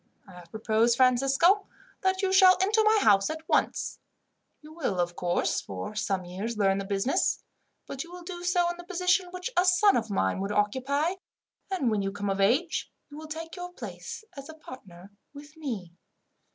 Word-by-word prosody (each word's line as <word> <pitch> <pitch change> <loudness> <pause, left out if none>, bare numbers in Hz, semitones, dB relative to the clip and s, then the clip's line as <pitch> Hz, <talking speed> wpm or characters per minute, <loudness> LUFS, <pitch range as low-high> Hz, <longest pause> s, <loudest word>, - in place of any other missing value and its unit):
"I - - -14
have 180 -1 -13
proposed, 220 +2 +1
Francisco, 270 - +3 0.3
that 375 +1 0
you 380 0 +1
shall 375 -1 +7
enter 420 +4 +3
my 435 0 +4
house 195 -2 +4
at 315 0 -6
once. - - 0 0.6
You 305 +1 -13
will, 260 - -2
of 175 0 -1
course, 175 -1 0
for 95 - -6
some 195 -3 -2
years 200 +6 -5
learn 195 -1 +2
the 195 - -4
business, 200 - 0 0.4
but 275 - -5
you 340 - -15
will 355 0 -10
do 350 0 -7
so 355 -1 +2
in 345 - -9
the 350 - -9
position 360 0 +1
which 365 +7 -5
a 355 - +4
son 370 +3 +4
of 225 -2 -1
mine 140 - 0
would 195 +1 -3
occupy, 265 - 0 0.6
and 300 -12 0
when 210 -2 0
you 195 0 -2
come 205 0 -3
of 195 0 -1
age, 275 - +1 0.2
you 290 - -10
will 315 0 -9
take 325 +2 -7
your 355 -1 -7
place 410 - -8
as 275 +1 -9
a 315 - -9
partner 200 - -13 0.2
with 290 +2 -12
me. 225 - -6
275 Hz, 190 wpm, -27 LUFS, -, 0.6 s, shall